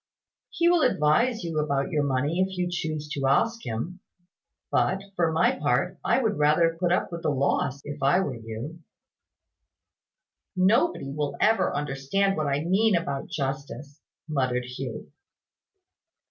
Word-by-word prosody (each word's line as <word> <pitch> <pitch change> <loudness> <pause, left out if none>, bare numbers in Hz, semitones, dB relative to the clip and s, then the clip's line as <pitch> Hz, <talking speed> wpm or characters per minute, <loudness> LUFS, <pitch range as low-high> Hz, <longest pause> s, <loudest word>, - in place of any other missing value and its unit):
He 340 - +1
will 345 -1 +4
advise 220 - +2
you 165 -2 -2
about 140 -2 -1
your 150 - +1
money, 140 +5 0
if 190 0 0
you 180 0 0
choose 155 -3 -3
to 140 -2 -1
ask 230 - +2
him: 145 +12 -4 0.7
but, 195 +1 +1
for 170 -3 +2
my 160 +2 +3
part, 140 +5 0
I 235 - +3
would 220 - 0
rather 160 +3 +3
put 175 -1 +1
up 175 - +1
with 170 -1 -5
the - - 0
loss, 140 -1 0
if 145 0 -7
I 140 +7 +4
were 150 -8 -1
you." 115 +8 -7 1.8
"Nobody 190 - +2
will 145 0 -3
ever 225 +1 +2
understand 145 +8 0
what 155 -2 -1
I 140 +1 0
mean 195 +4 +3
about 140 -5 -2
justice," 140 +1 -5 0.3
muttered 130 -5 0
Hugh. 125 0 -7
150 Hz, 145 wpm, -26 LUFS, 140-185 Hz, 1.8 s, will